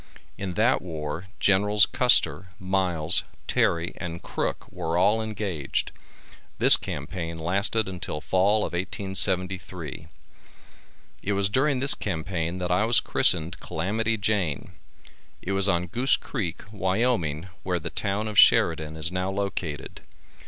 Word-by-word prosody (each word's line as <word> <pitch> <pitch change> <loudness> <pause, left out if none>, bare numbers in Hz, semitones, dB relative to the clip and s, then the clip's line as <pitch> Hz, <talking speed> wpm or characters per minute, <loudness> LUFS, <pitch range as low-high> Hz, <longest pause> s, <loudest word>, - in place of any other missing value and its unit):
In 95 -3 -6
that 115 +4 +2
war 80 0 -6
Generals 105 +2 +4
Custer, 125 -6 +3
Miles, 90 -3 +3 0.2
Terry 85 0 0
and 85 -1 -7
Crook - - -3
were 80 +1 -3
all 105 +5 +3
engaged. 100 -10 -3 0.7
This - - +9
campaign 80 +3 -6
lasted 100 +6 0
until 90 -5 -5
fall 95 +8 +1
of - - -7
1873. 95 -4 -1 1.1
It 105 - -2
was 100 0 0
during 135 +6 +1
this 140 +2 +4
campaign 85 -1 -4
that 90 -1 -3
I 90 +4 +2
was 115 +2 +4
christened 85 +2 +3
Calamity 110 +7 -2
Jane. 100 -8 -2 0.7
It 95 - -5
was 100 0 +2
on 85 -1 +1
Goose 120 +10 +1
Creek, 100 - -5
Wyoming, 95 -5 -1
where 90 -1 -2
the 85 +1 -6
town 105 +1 -2
of 105 -1 +1
Sheridan 80 -1 +4
is 80 +2 -1
now 90 +1 -2
located. 95 -8 -5
95 Hz, 130 wpm, -25 LUFS, 85-105 Hz, 1.1 s, This